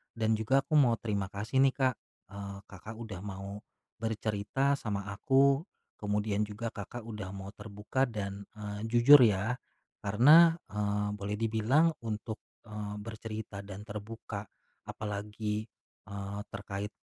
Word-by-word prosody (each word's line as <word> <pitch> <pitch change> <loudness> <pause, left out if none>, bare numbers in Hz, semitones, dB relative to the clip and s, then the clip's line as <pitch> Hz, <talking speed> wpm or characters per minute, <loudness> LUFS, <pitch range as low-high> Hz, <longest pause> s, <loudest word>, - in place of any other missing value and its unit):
dan 110 -1 0
juga 135 +5 +3
aku 150 +2 +4
mau 120 -4 +5
terima 100 -4 -2
kasih 105 +6 -1
nih, 135 0 +5
Kak, 130 -3 +2 0.4
eee, 100 -1 -6
Kakak, 105 +4 -9
udah 110 -5 -7
mau, 100 +1 -6 0.4
bercerita 110 +5 0
sama 100 -2 -3
aku, 135 - +4 0.4
kemudian 105 0 0
juga 110 +2 -4
Kakak, 110 +3 -7
udah 105 -4 -6
mau 95 +1 -7
terbuka 105 +6 -2
dan, 100 -3 -4
eee, 105 -1 -5
jujur 120 +5 +8
ya, 110 +3 +3 0.5
karena, 150 +11 +7 0.2
eee, 105 0 0
boleh 100 +1 -2
dibilang 115 +9 +3
untuk, 110 0 -4 0.3
eee, 105 -1 -5
bercerita 110 -2 -6
dan 100 +1 -8
terbuka, 105 -1 -6 0.4
apalagi, 105 +1 -3 0.4
eee, 100 0 -5
terkait, 100 +1 -5
105 Hz, 130 wpm, -31 LUFS, 100-115 Hz, 0.5 s, jujur